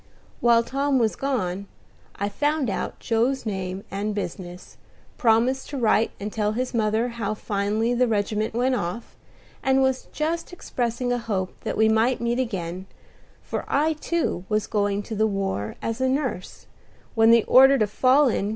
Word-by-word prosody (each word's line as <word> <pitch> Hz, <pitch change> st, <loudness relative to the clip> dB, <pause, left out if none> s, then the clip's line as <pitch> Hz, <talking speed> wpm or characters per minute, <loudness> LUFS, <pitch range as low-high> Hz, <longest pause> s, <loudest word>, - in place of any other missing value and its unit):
While 235 Hz, -1 st, +4 dB
Tom 275 Hz, +3 st, 0 dB
was 225 Hz, -3 st, +1 dB
gone, 200 Hz, -8 st, -2 dB, 0.5 s
I 200 Hz, -, -2 dB
found 290 Hz, +3 st, 0 dB
out -, -, -3 dB
Joe's 240 Hz, +3 st, 0 dB
name 190 Hz, -2 st, -4 dB
and 205 Hz, +2 st, -2 dB
business, 180 Hz, -2 st, -6 dB, 0.4 s
promised 240 Hz, +3 st, +2 dB
to 285 Hz, -, -4 dB
write 225 Hz, -2 st, +3 dB
and 205 Hz, +1 st, -5 dB
tell 210 Hz, -1 st, 0 dB
his 255 Hz, +3 st, -2 dB
mother 220 Hz, +1 st, +1 dB
how 220 Hz, -3 st, -3 dB
finely 210 Hz, +3 st, -1 dB
the 245 Hz, +1 st, +2 dB
regiment 215 Hz, 0 st, -1 dB
went 255 Hz, +2 st, +2 dB
off, 220 Hz, 0 st, -4 dB, 0.5 s
and 265 Hz, -1 st, +3 dB
was 265 Hz, -1 st, 0 dB
just 330 Hz, +3 st, -2 dB
expressing 245 Hz, -7 st, -2 dB
a 245 Hz, -, +1 dB
hope 200 Hz, -5 st, -2 dB
that -, -, -3 dB
we 220 Hz, -, +4 dB
might 225 Hz, +3 st, +2 dB
meet 235 Hz, +1 st, -1 dB
again, 185 Hz, -6 st, -3 dB, 0.6 s
for -, -, -4 dB
I 305 Hz, +3 st, +2 dB
too 315 Hz, -, -2 dB
was 215 Hz, -1 st, +1 dB
going 205 Hz, -1 st, 0 dB
to 225 Hz, -, -7 dB
the 220 Hz, +1 st, +2 dB
war 195 Hz, -, -2 dB
as 225 Hz, +2 st, -3 dB
nurse, 260 Hz, -7 st, -2 dB, 0.5 s
when 225 Hz, 0 st, +5 dB
the 230 Hz, -1 st, +6 dB
order 270 Hz, +2 st, +7 dB
to 215 Hz, -, +3 dB
"Fall 260 Hz, +7 st, +4 dB
in!" 205 Hz, -4 st, 0 dB
225 Hz, 165 wpm, -24 LUFS, 205-260 Hz, 0.6 s, order